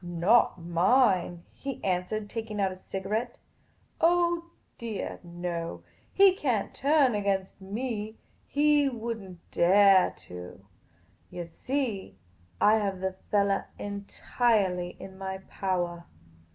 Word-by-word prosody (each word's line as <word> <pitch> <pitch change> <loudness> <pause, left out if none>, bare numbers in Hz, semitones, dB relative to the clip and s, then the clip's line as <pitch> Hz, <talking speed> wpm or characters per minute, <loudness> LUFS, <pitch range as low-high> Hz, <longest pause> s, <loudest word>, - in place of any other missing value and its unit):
" - - -23
Not 175 +5 +3
mine," 175 0 +2
he 275 -1 -6
answered, 190 +3 -1
taking 220 -1 -5
out 195 -1 +2
a - - -7
cigarette. 210 +6 -3 0.3
" - - -27
Oh 345 0 +3 0.3
deah 225 -4 -4
no. 170 - -5 0.3
He 390 -1 +6
can't 250 - -1
turn 280 -3 +3
against 200 -2 -1
inc. 215 +1 -4 0.3
He 290 -1 +3
would 230 -2 -4
n't 185 -3 -14
dare 190 +1 +6 0.2
to. 90 0 -10 0.6
Yah 175 - -5
see, 215 - -3 0.4
I 215 +1 +5
have 200 -3 -1
the 190 0 -2 0.2
fellah 200 -1 +2
entirely 200 -2 -1
in 190 0 -10
my 190 0 -4
powah. 175 -3 -2
200 Hz, 120 wpm, -28 LUFS, 180-235 Hz, 0.6 s, He